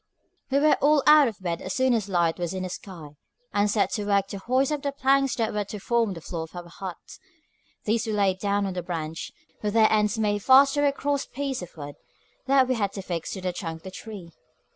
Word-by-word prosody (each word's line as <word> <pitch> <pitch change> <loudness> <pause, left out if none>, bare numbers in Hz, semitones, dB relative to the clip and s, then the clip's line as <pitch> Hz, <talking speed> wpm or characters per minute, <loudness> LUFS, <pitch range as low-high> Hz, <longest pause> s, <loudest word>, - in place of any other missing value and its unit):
We 270 - +2
were 300 +2 +4
all 295 0 +4
out 300 -2 +7
of 220 - -5
bed 170 -2 -3
as 185 - -4
soon 260 -1 +3
as 215 -4 -1
light 170 -2 +1
was 175 +1 -3
in 185 - -3
the 185 - -4
sky, 175 -6 -9 0.4
and 205 +1 +2
set 205 0 +1
to 210 - -2
work 200 -1 +3
to 200 - -6
hoist 255 +7 +1
up 295 -2 -1
the 280 -1 -2
planks 275 -1 +2
that 225 -2 -1
were 210 -1 -1
to 210 - -7
form 230 -2 0
the 165 - -9
floor 165 0 -5
of - - -18
our 175 -1 -7
hut. 180 +1 -7 0.9
These 220 +1 0
we 220 - -1
laid 195 -3 +1
down 200 0 0
on 190 - -3
the 180 - -3
branch, 165 -2 -5 0.3
with 210 0 -2
their 220 -1 +5
ends 210 0 +2
made 205 -1 +1
fast 270 +4 +6
to 290 0 +2
a - - +3
cross 280 0 -2
piece 275 -4 -3
of 175 -1 -10
wood 145 -1 -8 0.5
that 265 -1 +4
we 255 - +1
had 205 -5 -1
to 195 - -6
fix 170 -3 -4
to 190 - -6
the 180 -1 -2
trunk 165 -2 -6
of - - -32
the 190 - -8
tree. 195 -4 -9
205 Hz, 250 wpm, -26 LUFS, 185-260 Hz, 0.9 s, out